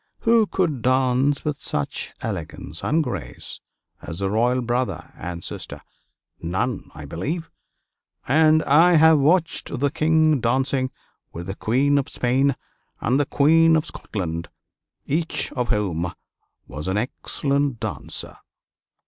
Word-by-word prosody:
Who 225 -2 +4
could 160 -11 0
dance 130 +3 +2
with 150 -2 -1
such 75 -1 -3
elegance 75 +3 -5
and 160 +2 +2
grace - - -6 0.4
as 85 - -7
the 95 0 -1
royal 120 +4 +2
brother 120 +2 -2
and 85 -1 -6
sister? - - -6 0.6
None, 95 +8 -2
I 75 -1 -8
believe; 150 - -4 0.8
and 155 +3 +5
I 165 +6 +5
have 160 -1 +6
watched 160 -2 +1
the 140 0 +1
King 155 -1 +3
dancing 130 +2 +1 0.4
with 85 +1 -6
the 95 +1 -5
Queen 140 +7 +2
of 135 - -3
Spain 130 +2 +1 0.4
and 130 +4 +1
the 145 - +1
Queen 160 +3 +5
of 160 0 +1
Scotland, 85 - -5 0.6
each 160 +3 -1
of 125 -2 -2
whom 90 -5 0 0.5
was 75 +5 -7
an 95 +2 0
excellent 140 +3 -1
dancer. - - -5
135 Hz, 130 wpm, -23 LUFS, 105-155 Hz, 0.8 s, have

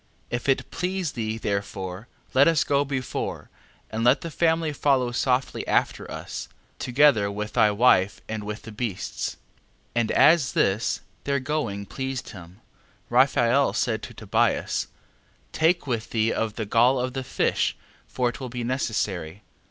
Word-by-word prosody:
11:3. - - 0
If 120 - -5
it 135 - +1
please 180 -2 -2
thee 110 -3 -3
therefore, 100 -1 -4 0.3
let 135 +3 +6
us 165 -3 +4
go 140 0 +2
before, 135 -2 -4 0.4
and 110 +1 -2
let 125 +4 +4
the 165 - -6
family 160 0 +1
follow 135 -4 +2
softly 125 +1 0
after - - 0
us, - - -6 0.3
together 125 -5 +4
with 105 +1 -5
thy 110 - +5
wife, 105 -3 +3
and 110 -1 -4
with 105 +1 -6
the 110 - -9
beasts. 105 -3 -4 0.6
11:4. 120 - +3
And 110 - -1
as 155 -4 +5
this 100 +4 +1 0.2
their 140 0 +1
going 130 -8 -2
pleased 130 +3 -4
him, 90 +1 -12 0.5
Raphael 130 +1 +4
said 110 -4 0
to - - -9
Tobias: - - 0 0.6
Take 165 +1 +2
with 120 -4 -2
thee 110 0 +1
of 110 -1 -2
the 110 - -3
gall 120 +5 +4
of 125 0 -2
the 135 -1 -3
fish, 130 - 0 0.3
for 125 -1 0
it 120 - -4
will 130 -2 -5
be 120 0 -4
necessary. 105 - -2
120 Hz, 160 wpm, -25 LUFS, 105-140 Hz, 0.6 s, let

